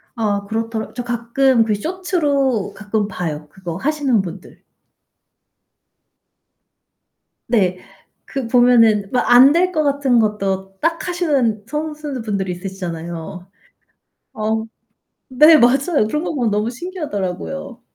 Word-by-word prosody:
아 205 -3 -1
그렇더라 225 0 -3
저 245 - -3
가끔 240 +1 +2
그 215 -1 0
쇼츠로 280 - -1
가끔 210 0 -2
봐요. 155 -6 -5
그거 175 -2 -7
하시는 275 -4 +1
분들. 180 0 -10 2.8
네, 190 -6 +1 0.5
그 265 -4 -4
보면은 230 -4 +4
막 250 - 0
안 255 +3 +8
될 365 +2 +2
것 310 -3 0
같은 275 -4 +2
것도 195 -3 -1
딱하시는 305 - 0
선수분들이 275 -11 -4
있으시잖아요. 175 -1 -7 0.9
어 220 +1 -1 0.7
네, 305 +5 +7
맞아요. 270 0 +3
그런 300 +8 -2
거 - - -3
보면 240 -5 0
너무 210 +2 0
신기하더라고요. 255 - -5
230 Hz, 235 characters per minute, -19 LUFS, 200-280 Hz, 2.8 s, 안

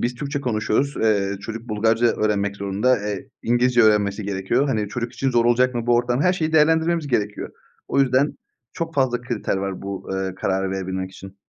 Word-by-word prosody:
biz 120 +1 -1
Türkçe 140 +2 -4
konuşuyoruz. 125 +3 0
Eee, 100 -3 +1
çocuk 115 +2 -7
Bulgarca 115 +2 +2
öğrenmek 100 -3 0
zorunda. 100 +6 +1
Eee, 105 -1 -5
İngilizce 120 0 +3
öğrenmesi 105 -1 +3
gerekiyor. 100 +8 0
Hani, 105 -5 -1
çocuk 120 +3 -4
için 135 -1 -1
zor 120 -1 +2
olacak 125 +1 +3
mı 120 0 -3
bu 120 - +4
ortam? 120 +3 +1
Her 180 - +4
şeyi 160 -3 -2
değerlendirmemiz 160 +1 +3
gerekiyor. 105 -5 -2 0.4
O - - +2
yüzden 135 +2 +2 0.3
çok 165 -1 -4
fazla 130 -3 +1
kriter 120 -5 -2
var 95 -1 -4
bu, 100 -1 -6
eee, 95 -1 -2
kararı 95 0 -1
verebilmek 95 -1 -3
için. 95 +1 -12
115 Hz, 185 wpm, -22 LUFS, 100-130 Hz, 0.4 s, bu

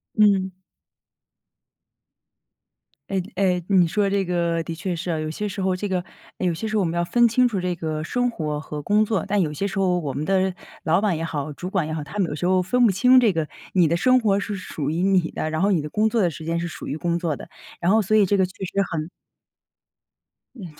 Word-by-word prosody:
嗯。 200 -3 +4 2.6
哎 190 -1 0
哎， 180 -2 +1
你 185 -4 +4
说 205 +2 +1
这 195 0 +1
个 170 -2 0
的 165 - -6
确 175 +3 -3
是 175 +1 -4
啊。 160 - -1
有 155 0 -3
些 210 +7 -3
时 200 0 -5
候， 190 -1 +1
这 205 +2 -3
个 185 -1 0 0.4
哎， 185 - -1
有 170 - +1
些 220 +7 -4
时 215 - -1
候 - - +3
我 190 - +1
们 165 - -2
要 175 - +1
分 240 +6 +4
清 250 +2 +3
楚 200 -5 -2
这 180 -1 -1
个 155 -2 -4
生 245 +7 0
活 150 -8 -3
和 150 -1 -6
工 210 +5 +3
作。 205 -5 -1
但 200 0 +1
有 155 -4 0
些 195 +7 -2
时 195 0 -2
候 180 -2 +2
我 145 -6 -3
们 145 +3 -3
的 190 0 +1 0.3
老 170 +3 +3
板 200 -5 +1
也 165 - -3
好、 150 -2 -3
主 180 +5 -6
管 190 -4 0
也 155 - -4
好， 155 -2 -3
他 205 +7 -5
们 180 - +1
有 150 - -4
时 175 - -2
候 185 0 +3
分 245 +6 +3
不 200 - +3
清 250 +7 +5
这 230 -5 +4
个 160 -3 -2 0.2
你 175 -4 +4
的 170 - +1
生 255 +6 +4
活 200 -3 +2
是 205 +1 -3
属 155 -6 -4
于 170 +3 -1
你 190 -4 +3
的， 155 - -3
然 155 0 -2
后 200 +1 +3
你 165 -5 +1
的 150 - -6
工 215 +1 +2
作 225 -1 +1
的 175 - +2
时 160 +2 -9
间 165 +1 -1
是 175 - -3
属 - - -8
于 145 - -3
工 170 +1 -1
作 165 -3 -1
的， - - -10 0.3
然 175 +2 +2
后 220 - +5
所 215 +1 +2
以 210 - +6
这 200 +2 +2
个 190 -1 +3
确 185 +1 -8
实 180 - -7 0.2
很 160 +1 -3 1.5
嗯， 215 -8 -9
185 Hz, 275 characters per minute, -23 LUFS, 165-200 Hz, 2.6 s, 以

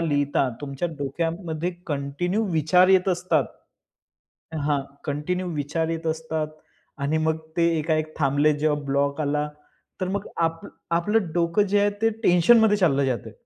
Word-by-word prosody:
लिहिता 145 -4 +1
तुमच्या 140 +3 -3
डोक्यामध्ये 165 +4 -2 0.2
कंटिन्यू 155 +8 -1
विचार 165 +4 +4
येत 190 0 +4
असतात. 175 -5 +1 1.2
हां, 145 -2 +2 0.2
कंटिन्यू 160 +6 -2
विचार 150 +3 -1
येत 165 0 -3
असतात 160 -1 -2 0.5
आणि 150 +3 +1
मग 160 0 +2 0.2
ते 170 - +3
एकाएक 155 0 -1
थांबले 145 +1 +3
जेव्हा 150 -1 +1
ब्लॉक 140 +2 0
आला, 150 0 0 0.5
तर 185 - -1
मग 200 +1 -3 0.2
आप 165 0 0 0.3
आपलं 175 +3 +1
डोकं 170 +4 +2
जे 200 +1 +2
आहे 205 0 +3
ते 225 - +4
टेन्शनमध्ये 210 +4 +5
चाललं 145 -8 +2
जातंय. 120 -3 -3
160 Hz, 140 wpm, -24 LUFS, 145-180 Hz, 1.2 s, टेन्शनमध्ये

